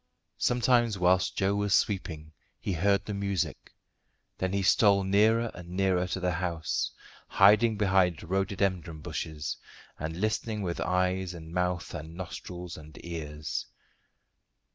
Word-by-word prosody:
Sometimes 120 -3 +3
whilst 90 0 +2
Joe 95 +1 +2
was 100 -1 +2
sweeping 80 -6 -1 0.3
he 95 - -2
heard 100 +4 +2
the 105 - -4
music; 100 -3 -2 0.7
then 95 0 0
he 100 0 0
stole 100 0 +5
nearer 110 +4 +3
and 90 -1 -10
nearer 90 -1 +1
to 95 - -3
the 90 -1 0
house, 85 -2 -1 0.4
hiding 105 +3 +5
behind 95 -5 +2
rhododendron 95 -3 -1
bushes, 75 -1 -4 0.4
and 80 +3 -4
listening 110 0 -1
with 85 -2 -3
eyes 90 0 0
and 80 0 -10
mouth 90 0 -1
and 80 0 -7
nostrils 90 -1 -7
and 75 0 -12
ears. 75 -3 -4
95 Hz, 130 wpm, -29 LUFS, 85-100 Hz, 0.7 s, stole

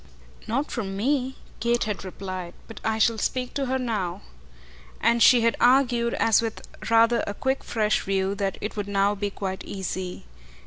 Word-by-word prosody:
"Not 275 +7 -1
from 195 -5 -3
me," 265 +3 0 0.2
Kate 235 +1 +1
had 210 -2 -3
replied. 185 -2 -6
"But 225 - -10
I 220 0 0
shall 220 0 +2
speak 250 +2 -2
to 275 -2 -1
her 260 +1 +1
now." 215 - -2 0.8
And 235 0 +2
she 245 0 +7
had 230 0 +2
argued, 245 -2 +4
as 225 -1 +4
with 225 -1 -5 0.2
rather 230 0 +4
a 205 - -3
quick 265 +4 -1
fresh 215 -2 +1
view, 195 0 0
that 200 -1 -2
it 210 - -4
would 205 -1 -3
now 200 0 +2
be 205 0 -2
quite 190 -1 -5
easy. 190 - -5
220 Hz, 175 wpm, -25 LUFS, 195-240 Hz, 0.8 s, she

